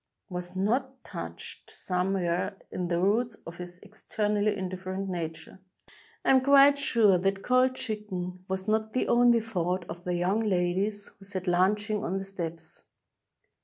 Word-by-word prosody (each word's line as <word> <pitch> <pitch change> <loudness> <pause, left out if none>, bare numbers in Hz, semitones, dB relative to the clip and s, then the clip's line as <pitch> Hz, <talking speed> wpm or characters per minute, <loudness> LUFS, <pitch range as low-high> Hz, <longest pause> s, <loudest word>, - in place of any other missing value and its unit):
was 180 0 -5
not 255 +7 -1
touched - - -8
some 180 +1 -1
where 180 +1 -1
in 180 -1 -2
the 170 0 0
roots 220 +5 +2
of 165 - -8
his 180 0 -7
externally 210 0 -1
indifferent 185 +1 -4
nature. 165 -1 -5 0.7
I - - +5
am 260 -1 +6
quite 280 +1 +6
sure 215 -9 +4
that 195 +1 0
cold 255 +1 +3
chicken 185 -6 -5
was 190 +1 -3
not 220 0 0
the 255 - 0
only 240 -1 +5
65 - - -11
EGYPT 225 - -12 0.3
thought - - -22
of 175 +1 -8
the 180 -1 -1
young 180 +5 +1
ladies 200 0 0
who 195 - -13
sat 190 -2 -4
lunching 205 +4 +2
on 190 - -1
the 195 - -3
steps. 170 -4 -6
195 Hz, 165 wpm, -28 LUFS, 180-220 Hz, 0.7 s, am